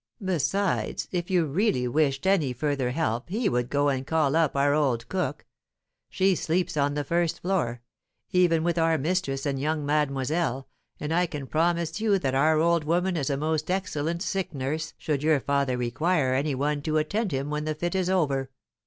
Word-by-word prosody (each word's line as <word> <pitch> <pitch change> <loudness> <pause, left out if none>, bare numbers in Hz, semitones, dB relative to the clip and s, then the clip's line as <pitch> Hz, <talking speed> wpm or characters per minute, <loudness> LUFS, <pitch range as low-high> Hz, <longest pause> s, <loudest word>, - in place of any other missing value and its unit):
Besides, 190 +2 0
if 175 -2 -2
you 180 -3 +3
really 145 - +1
wished 135 +1 +1
any 175 -10 +2
further 140 -1 -1
help 125 -2 -2
he 215 +5 0
would 120 0 0
go 145 +1 +2
and 135 -1 -2
call 155 -3 +2
up 160 -4 +2
our 140 +1 +3
old 130 -6 +1
cook; 185 -1 -2 0.6
she 190 0 +2
sleeps 175 0 -1
on 145 -1 +1
the 145 - -1
first 170 +3 0
floor, 125 -11 -1 0.5
even 175 -3 +3
with 170 0 0
our 165 0 +3
mistress 145 -3 -1
and 140 -2 -1
young 150 +1 -1
mademoiselle, 140 -1 0 0.3
and 150 +2 -2
I 175 +1 +2
can 150 -4 -6
promise 170 +5 0
you 210 -3 +3
that 135 -8 -1
our 155 +4 +3
old 170 0 +3
woman 175 +4 +1
is 145 -4 -1
a 140 - 0
most 155 +2 -1
excellent 170 -2 -1
sick 190 -6 -2
nurse 150 +4 -3
should 145 -3 -2
your 155 -1 +3
father 140 -2 0
require 130 +3 +1
any 140 +2 0
one 145 +2 -1
to 155 +1 0
attend 200 +8 0
to 140 - -2
him 140 +2 -3
when 150 0 -2
the 155 0 -2
fit 175 +4 -2
is 185 -1 0
over." 140 -8 +1
155 Hz, 190 wpm, -26 LUFS, 140-175 Hz, 0.6 s, you